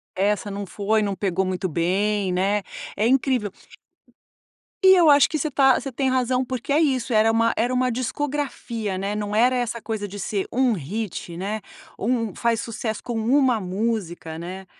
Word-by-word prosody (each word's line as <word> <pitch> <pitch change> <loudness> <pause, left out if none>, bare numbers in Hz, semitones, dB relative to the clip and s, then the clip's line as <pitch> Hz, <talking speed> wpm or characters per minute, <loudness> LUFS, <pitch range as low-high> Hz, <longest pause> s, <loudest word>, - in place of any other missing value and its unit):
Essa 205 +1 0
não 200 0 -4
foi, 210 +3 0
não 200 -2 -1
pegou 190 -1 0
muito 185 0 -2
bem, 190 +4 0
né. 195 +3 +1 0.4
É 215 +2 +2
incrível. 255 -5 +1 1.3
E 380 0 +8
eu 340 -4 +5
acho 285 -1 +6
que 315 - -1
você 305 +1 -2
tá, 270 -1 +4
você 270 - -5
tem 265 +2 0
razão, 255 0 +1
porque 255 +2 -4
é 290 - +4
isso, 265 -6 +1
era 215 +1 +4
uma 230 0 +2
era 240 +3 +1
uma 255 0 +1
discografia, 255 -5 -3
né, 195 +2 -2
não 210 0 -3
era 245 +4 +4
essa 235 -1 -2
coisa 215 -2 -4
de 205 +1 -9
ser 200 0 -2
1 255 0 +3
hit, 190 0 -4
né, 200 +5 -3 0.4
um 230 -2 -1
faz 230 +2 0
sucesso 220 -1 -4
com 240 - -4
1 250 +1 +3
música, 185 -5 -3
né? 185 +3 -7
220 Hz, 180 wpm, -23 LUFS, 200-255 Hz, 1.3 s, E